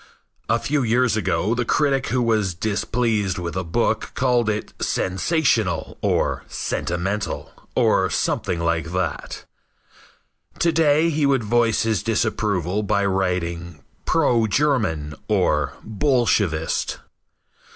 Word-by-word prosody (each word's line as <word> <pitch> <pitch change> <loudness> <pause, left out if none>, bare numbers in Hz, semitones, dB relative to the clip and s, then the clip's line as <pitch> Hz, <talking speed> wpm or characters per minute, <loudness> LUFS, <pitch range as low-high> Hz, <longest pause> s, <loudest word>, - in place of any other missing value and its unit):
A 115 - +4
few 145 +4 -1
years 120 0 +2
ago 110 0 0
the 120 0 0
critic 135 +1 +1
who 125 -1 +1
was 110 -6 +1
displeased 110 +1 0
with 85 -2 -4
a 95 - -1
book 110 +5 -1
called 125 -3 +2
it 105 0 -3
"sensational" 105 - 0
or - - 0
"sentimental" 95 +5 -3 0.2
or - - +3
something 85 - -1
like 85 0 -1
that. 90 -5 -3 1.1
To 170 - +2
day 160 0 +3
he 150 -2 +1
would 135 -4 +2
voice 115 +1 +2
his 110 -3 0
disapproval 105 -4 0
by 100 -1 +1
writing 90 -3 -2 0.2
"Pro 125 -8 +2
German" 105 - 0
or - - +1
"Bolshevist." 110 - 0
110 Hz, 115 wpm, -22 LUFS, 90-125 Hz, 1.1 s, A